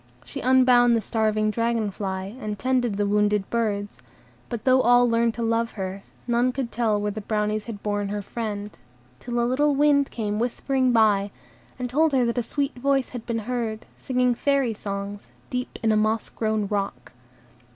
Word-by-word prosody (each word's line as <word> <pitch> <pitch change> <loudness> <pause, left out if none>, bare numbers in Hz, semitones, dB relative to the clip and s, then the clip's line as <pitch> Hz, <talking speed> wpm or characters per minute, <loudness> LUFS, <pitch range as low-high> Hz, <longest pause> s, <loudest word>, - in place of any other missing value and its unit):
She - - -7
unbound 250 -2 +5
the - - +2
starving 215 0 0
dragon 230 -2 0
fly, 190 +1 -4
and 210 -3 -4
tended 245 -1 0
the 205 - +1
wounded 210 -1 +1
birds; 205 -3 -1 0.5
but 235 -3 -4
though 260 0 +5
all 245 0 +5
learned 230 0 +2
to 235 - -3
love 230 0 0
her, 190 -1 -5 0.2
none 240 +1 +2
could 255 -2 -4
tell 220 -3 +1
where 205 0 -1
the 215 +1 -6
Brownies 210 0 -1
had 215 -4 -8
borne 205 -1 -1
her 205 0 -3
friend, 210 -2 -4 0.5
till 240 -1 -3
a 235 - +2
little 280 +4 +2
wind 285 -1 +3
came 210 -2 -3
whispering 255 +2 0
by, 210 -3 +3 0.5
and 250 -1 -3
told 300 +5 +2
her 255 -2 +3
that 235 +1 0
a - - +1
sweet 280 +4 -2
voice 270 +1 0
had 245 -2 -8
been 235 -1 -1
heard, 235 -2 -3
singing 250 -2 +1
Fairy 275 -1 +1
songs, 200 0 -6 0.2
deep 250 -1 -3
in 220 - +3
a 215 - +3
moss 215 +1 0
grown 215 -2 -1
rock. 200 0 -3
230 Hz, 185 wpm, -24 LUFS, 210-250 Hz, 0.5 s, unbound